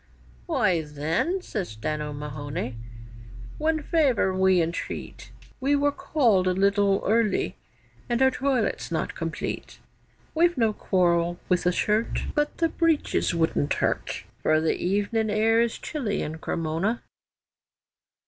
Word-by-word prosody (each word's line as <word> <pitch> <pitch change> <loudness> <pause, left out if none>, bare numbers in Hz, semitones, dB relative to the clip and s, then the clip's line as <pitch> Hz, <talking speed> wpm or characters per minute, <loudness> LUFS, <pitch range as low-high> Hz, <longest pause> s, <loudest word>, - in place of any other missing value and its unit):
'Why, 210 - +2
then,' 160 - -1
says 185 - -4
Dan 150 +8 -3
O'Mahony, 145 -2 -5 0.8
'one 315 0 +1
favour 270 - +2
we 190 -1 +4
entreat, 165 0 -4 0.3
We 280 +2 +2
were 285 0 +2
called 230 -12 +2
a 185 - +3
little 200 +1 +2
early, 220 0 +1 0.5
and 240 0 +1
our 265 0 +5
toilet's 265 -3 0
not - - -1
complete. - - -5 0.6
We've 340 0 +3
no 225 -3 +2
quarrel 175 -3 +1
with 180 -1 +2
the 180 - +4
shirt, 210 +5 0
But 295 -1 0
the 330 -1 +2
breeches 320 - +1
wouldn't 160 -3 +1
hurt, - - -1 0.2
For 155 0 +3
the 160 0 +1
evening 205 +4 0
air 220 +2 +3
is 235 -1 0
chilly 230 -10 -3
in 160 +1 -5
Cremona. 165 +9 -2
200 Hz, 130 wpm, -26 LUFS, 170-260 Hz, 0.8 s, our